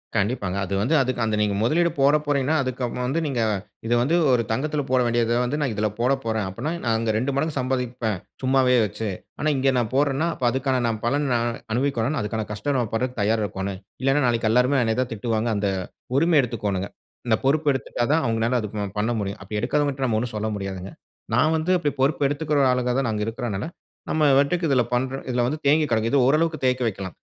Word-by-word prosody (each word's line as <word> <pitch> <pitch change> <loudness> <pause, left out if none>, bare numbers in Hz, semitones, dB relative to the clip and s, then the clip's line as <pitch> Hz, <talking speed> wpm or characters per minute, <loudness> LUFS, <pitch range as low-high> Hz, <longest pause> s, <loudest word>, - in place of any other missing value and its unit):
கண்டிப்பாங்க. 100 -3 0
அது 100 - -5
வந்து 125 +10 +1
அதுக் 130 -2 -1
அந்த 110 -1 0
நீங்க 105 -1 +1
முதலீடு 165 +9 +2
போடப் 150 +2 +3
போறீங்கன்னா, 145 +1 +1
அதுக்கு 130 0 -4
அப்புறம் 125 +1 -3
வந்து 140 +6 0
நீங்க 135 -4 -2 0.5
இத 115 - +1
வந்து 145 +8 +2 0.2
ஒரு 120 -2 +3
தங்கத்தில 145 +5 -1
போட 130 0 +3
வேண்டியத 120 0 +1
வந்து 125 +4 -1
நான் 130 -6 0
இதில 105 +1 0
போடப்போறேன் 120 -4 0
அப்புட்ன்னா, 150 - -4
நான் 115 -1 +1
அங்க 115 0 -2
2 125 +6 0
மடங்கு 150 +1 -1
சம்பாதிப்பேன். 125 -4 -1 0.3
சும்மாவே 130 -1 +3
வச்சு. 105 +1 -4 0.3
ஆனா 155 - +1
இங்க 135 0 +3
நான் 120 -2 0
போட்றன்னா, 145 +3 +2
அப்ப 130 - -2
அதுக்கான 130 0 0
நான் 110 -2 -2
பலன் 140 +4 +1
நான் 120 0 0 0.2
அனுபவிக்கணுனா 135 +2 0
அதுக்கான 110 +1 -3
கஷ்டம் 105 +7 -2
நம்ம 120 -4 -1
பட்றக்கு 125 +1 -2
தயாரா 110 +1 +1
இருக்கோன்னு. 95 0 -4 0.3
இல்லன்னா, 135 +1 +3
நாளைக்கி 115 -2 +1
எல்லாருமே 125 +4 +3
என்னைய 110 0 0
தான் 125 -2 -3
திட்டுவாங்க. 115 +1 -1
அந்த 100 -1 0 0.5
உரிமை 165 +1 +4
எடுத்துக்கோணுங்க. 100 -6 -2 0.4
இந்த 110 - +4
பொறுப்பு 150 +3 +2
எடுத்துட்டா 130 -2 -2
தான் 160 -1 +2
அவுங்கனால 115 +2 +1
அத 105 - -3
ப 105 -1 -2 0.2
பண்ண 110 +3 +1
முடியும். 100 -1 -4
அப்பிடி 105 +2 -4
எடுக்காதவங்கட்ட 140 +2 0
நம்ம 115 -4 +1
ஒன்னும் 115 -1 -4
சொல்ல 110 +1 -2
முடியாதுங்க. 95 -1 -5 0.4
நான் 155 +1 +3
வந்து 160 +4 -1
அப்பிடி 150 -5 -1
பொறுப்பு 140 +1 +2
எடுத்துக்கிற 145 0 +1
ஆளுங்க 125 -1 0
தான் 125 -4 0
நாங்க 105 -1 -1
இருக்கிறனால, 115 -1 -3 0.4
நம்ம 155 -1 +1 0.2
வாட்டக்கு 165 +4 +1
இதில 130 -3 +3
பண்ற 130 +2 0
இதில 120 -1 +1
வந்து 150 +3 -2
தேங்கி 150 +2 +4
கிடக்குது. 115 0 +1
இது 135 -3 +4
ஓரளவுக்கு 155 +1 +1
தேக்கி 125 0 +1
வைக்கலாம். 95 -4 -5
125 Hz, 200 wpm, -24 LUFS, 110-140 Hz, 0.5 s, உரிமை